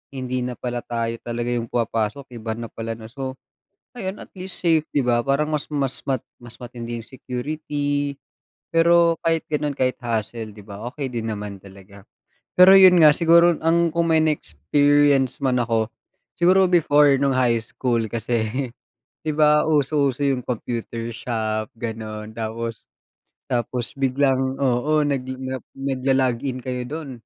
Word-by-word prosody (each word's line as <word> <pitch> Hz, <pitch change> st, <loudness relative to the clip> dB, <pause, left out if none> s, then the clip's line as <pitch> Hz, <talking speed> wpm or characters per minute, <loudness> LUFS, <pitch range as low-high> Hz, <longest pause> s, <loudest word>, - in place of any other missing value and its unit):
hindi 130 Hz, -1 st, -3 dB
na 125 Hz, 0 st, -3 dB
pala 120 Hz, -1 st, -3 dB
tayo 115 Hz, -1 st, -2 dB
talaga 120 Hz, 0 st, -3 dB
'yung 115 Hz, -1 st, -2 dB
pumapasok, 115 Hz, +3 st, -2 dB
iba 110 Hz, -1 st, -4 dB
na 115 Hz, -, -5 dB
pala 115 Hz, 0 st, -5 dB
na 110 Hz, -, -11 dB
so, 130 Hz, 0 st, -5 dB, 0.6 s
ngayon 190 Hz, -2 st, -4 dB
at -, -, -11 dB
least 185 Hz, 0 st, -7 dB
safe 165 Hz, -3 st, +3 dB
di 145 Hz, -, +3 dB
ba, 120 Hz, -1 st, +1 dB
parang 140 Hz, +3 st, +1 dB
mas 150 Hz, -1 st, -1 dB
mas 135 Hz, -2 st, -2 dB
ma 130 Hz, -3 st, 0 dB, 0.2 s
mas 120 Hz, -1 st, -13 dB
matindi 120 Hz, -1 st, -6 dB
'yung -, -, -16 dB
security. 145 Hz, +2 st, -3 dB, 0.6 s
Pero 170 Hz, 0 st, +5 dB
kahit 165 Hz, -1 st, +1 dB
gano'n 150 Hz, -1 st, -1 dB
kahit 130 Hz, 0 st, +1 dB
hassle 115 Hz, -1 st, -3 dB
di 105 Hz, -, -14 dB
ba, 100 Hz, 0 st, -9 dB
okey 140 Hz, -2 st, -4 dB
din 115 Hz, -1 st, -3 dB
naman 105 Hz, -2 st, -6 dB
talaga. 100 Hz, +1 st, -14 dB, 0.5 s
Pero 180 Hz, +1 st, +8 dB
'yun 185 Hz, -1 st, +8 dB
nga, 150 Hz, -, +9 dB
siguro 170 Hz, +1 st, +5 dB
ang 170 Hz, +1 st, +2 dB
kung 170 Hz, 0 st, +1 dB
may 160 Hz, -1 st, +4 dB
na-experience 145 Hz, -, +2 dB
man 130 Hz, -2 st, +2 dB
ako, 115 Hz, -2 st, 0 dB, 0.5 s
siguro 185 Hz, +1 st, +5 dB
before, 150 Hz, -4 st, +5 dB
no'ng 140 Hz, -1 st, +2 dB
high 125 Hz, -2 st, +3 dB
school, 115 Hz, 0 st, -1 dB
kasi 115 Hz, 0 st, -1 dB, 0.8 s
di 155 Hz, -, -1 dB
ba, 150 Hz, 0 st, +4 dB
uso 145 Hz, -1 st, +2 dB
uso 130 Hz, -, -13 dB
'yung 130 Hz, -2 st, 0 dB
computer 115 Hz, -1 st, -4 dB
shop 110 Hz, -3 st, -2 dB
gano'n 110 Hz, -1 st, -6 dB
tapos 115 Hz, 0 st, -4 dB, 0.7 s
tapos 120 Hz, 0 st, -2 dB
biglang 135 Hz, 0 st, +1 dB
oo, 140 Hz, +4 st, +2 dB
nag 140 Hz, -2 st, 0 dB
a 130 Hz, 0 st, -4 dB, 0.2 s
nag-lo-log 135 Hz, -2 st, 0 dB
in 130 Hz, -1 st, -4 dB
kayo 125 Hz, -1 st, -3 dB
do'n, 155 Hz, -1 st, -6 dB
130 Hz, 155 wpm, -22 LUFS, 115-150 Hz, 0.8 s, nga